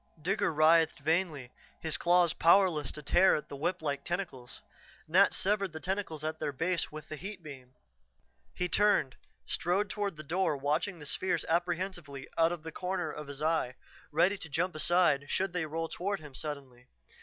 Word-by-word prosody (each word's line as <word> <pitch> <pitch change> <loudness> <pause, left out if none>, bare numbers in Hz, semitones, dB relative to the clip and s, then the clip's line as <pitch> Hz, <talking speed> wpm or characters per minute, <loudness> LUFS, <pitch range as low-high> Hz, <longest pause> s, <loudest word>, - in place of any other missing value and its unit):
Digger 185 +5 0
writhed 160 +1 +4
vainly, 155 -5 0 0.3
his 160 -2 -1
claws 175 -1 +3
powerless 170 -5 +4
to 150 - -8
tear 175 +7 +5
at 150 - -5
the 145 - -6
whip 170 +4 -2
like 140 -2 -2
tentacles. 175 -9 -5 0.5
Nat 185 +5 +5
severed 195 -3 0
the 160 - -6
tentacles 185 -4 -3
at 155 0 -3
their 150 -2 -1
base 165 +6 0
with 155 0 -9
the 155 - -6
heat 195 +3 -8
beam. 130 -4 -11 0.8
He 180 - -1
turned, 205 -9 +3 0.3
strode 195 +4 0
toward 205 -4 -2
the 155 - -9
door 165 0 0
watching 150 +7 -1
the 150 - -10
spheres 185 +6 -1
apprehensively 175 -4 -2
out 165 0 +4
of 175 -3 -5
the 160 - -6
corner 180 -2 -2
of 150 -1 -8
his 145 +1 -6
eye, 155 -6 +1 0.4
ready 180 +6 +3
to 165 - -9
jump 180 +5 0
aside 155 -3 +2
should 190 -1 0
they 170 -3 -1
roll 165 +2 -3
toward 195 +4 -3
him 150 -3 -12
suddenly. 130 -4 -7
165 Hz, 180 wpm, -31 LUFS, 150-180 Hz, 0.8 s, tear